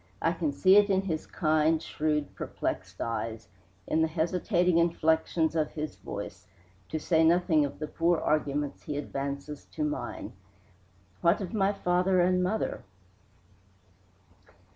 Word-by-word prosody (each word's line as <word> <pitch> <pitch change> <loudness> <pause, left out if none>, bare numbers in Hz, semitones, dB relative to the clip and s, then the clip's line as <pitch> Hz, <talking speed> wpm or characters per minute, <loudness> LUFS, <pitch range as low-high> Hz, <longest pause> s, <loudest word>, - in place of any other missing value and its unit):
I 165 - +2
can 160 -4 -1
see 190 +6 +5
it 205 0 +5
in 190 0 +2
his 160 -5 -3
kind, 155 -1 +2
shrewd, 150 -2 -2
perplexed - - -4
eyes, 115 0 -4 0.4
in 160 - +1
the 160 - +3
hesitating 175 +2 +1
inflections 160 -1 +1
of 155 -2 0
his 155 0 -4
voice, - - -7 0.4
to 155 - -2
say 160 +1 +2
nothing 165 -2 +4
of 140 - -6
the 155 - -4
poor 165 +2 +1
arguments 145 -2 -1
he 150 -2 -4
advances 140 0 -5
to 155 - -5
mine. 150 0 -4 0.9
What 170 +3 +4
of 195 +1 -5
my 200 -2 +2
father 185 -1 +1
and 180 +1 +3
mother?" 195 +5 -1
160 Hz, 140 wpm, -29 LUFS, 150-180 Hz, 0.9 s, see